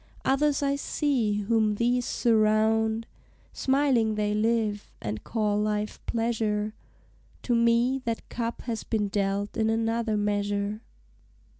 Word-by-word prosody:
Others 285 +1 +2
I 280 0 +1
see 245 -9 0
whom 215 0 +2
these 245 +2 +1
surround; 220 0 +2 0.5
Smiling 265 -5 +2
they 210 0 0
live, 215 -1 0
and 105 -1 -5
call 210 -2 0
life 210 0 -2
pleasure; 220 -2 -1 0.7
To 245 - 0
me 235 +3 +3
that 230 -1 -3
cup 235 -1 -4
has 230 -3 -3
been 210 -3 -1
dealt 200 0 -1
in 220 -1 +1
another 225 0 0
measure. 205 0 -1
220 Hz, 120 wpm, -27 LUFS, 210-235 Hz, 0.7 s, me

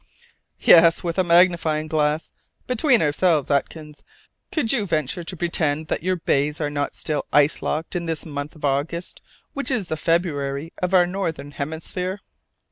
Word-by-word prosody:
"Yes, 165 -1 +6
with 170 +1 -2
a - - +4
magnifying 170 -3 +3
glass! 155 0 0 0.3
Between 250 - +3
ourselves, 150 -1 +1
Atkins, 150 +1 -2 0.5
could 275 -8 +1
you 235 -6 +1
venture 155 +1 -1
to 180 +2 -7
pretend 160 -2 -1
that - - -1
your 185 +2 0
bays 150 -3 0
are 150 -2 -2
not 145 -1 -2
still 150 -3 -3
ice 145 +1 +3
locked 160 +3 -3
in 170 -1 -2
this 160 -2 -3
month 145 0 -6
of 150 - -6
August, 145 +5 -2 0.3
which 280 - -2
is 235 -9 -1
the 160 - -2
February 155 -3 -1
of 180 +1 +1
our 180 -1 +6
northern 165 -6 -4
hemisphere?" 160 +6 -4
160 Hz, 160 wpm, -22 LUFS, 150-180 Hz, 0.5 s, Yes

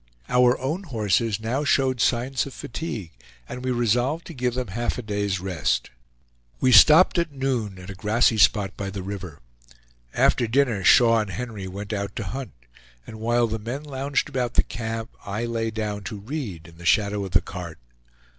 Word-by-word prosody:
Our 125 0 +4
own 150 +9 -2
horses 110 - 0
now 120 +6 -1
showed 130 -3 +2
signs 130 +3 +1
of 135 - -10
fatigue, 115 - -5 0.4
and 125 - -7
we 130 - -1
resolved 125 +6 +1
to 170 - -9
give 125 -3 -1
them 125 -4 -3
half 120 +5 -2
a 125 - -5
day's 100 -2 -1
rest. 90 -4 -1 0.7
We 130 - +3
stopped 155 - +7
at 170 -2 -1
noon 130 -8 -2
at 90 +1 -9
a - - -6
grassy 110 +3 +2
spot 100 -1 +3
by 100 -1 -4
the 95 -1 -6
river. 95 -7 -7 0.7
After 120 - +3
dinner 120 -4 +1
Shaw 115 +4 +6
and 105 -2 -2
Henry 110 -3 -5
went 100 +3 -6
out 100 -1 -3
to 110 - -3
hunt; 130 - -6 0.5
and 110 - -10
while 120 +2 +2
the 110 0 -3
men 120 +7 -5
lounged 140 -1 -2
about 125 -4 -2
the - - +5
camp, 115 0 -5
I 100 +4 -3
lay 115 -1 -2
down 105 -2 -3
to 110 - -5
read 100 - -6
in 85 0 -16
the - - -11
shadow 100 0 +2
of 95 - -7
the - - +6
cart. 85 -3 -8
115 Hz, 185 wpm, -24 LUFS, 100-125 Hz, 0.7 s, stopped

